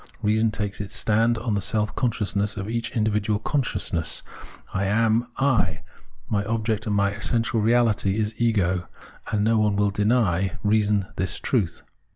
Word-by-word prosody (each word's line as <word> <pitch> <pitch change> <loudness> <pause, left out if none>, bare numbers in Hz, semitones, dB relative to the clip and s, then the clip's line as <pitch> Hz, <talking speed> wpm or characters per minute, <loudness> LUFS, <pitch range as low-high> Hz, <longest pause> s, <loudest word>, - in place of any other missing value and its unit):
Reason 110 +2 +3
takes 105 -1 -4
its 100 +1 -5
stand 115 +2 +2
on 115 0 -2
the 100 - 0
self 105 +1 0
conscious 115 -5 -1
ness 100 +1 0
of 100 0 -4
each 115 +1 -2
individual 105 -1 +1
consciousness: 110 - -1 0.5
I 95 +1 0
am 115 +3 +2
I, 115 - +1 0.4
my 100 -2 0
object 110 0 -1
and 105 - 0
my 100 0 +2
essential 115 +2 -1
reahty 110 -3 +2
is 110 0 -1
ego; 95 -7 +1 0.4
and 105 -1 +1
no 110 +1 +3
one 105 -1 +2
will 100 0 +2
deny 100 -3 +1
reason 105 -1 +2
this 95 +1 0
truth. 105 -11 -1
105 Hz, 160 wpm, -24 LUFS, 100-115 Hz, 0.5 s, Reason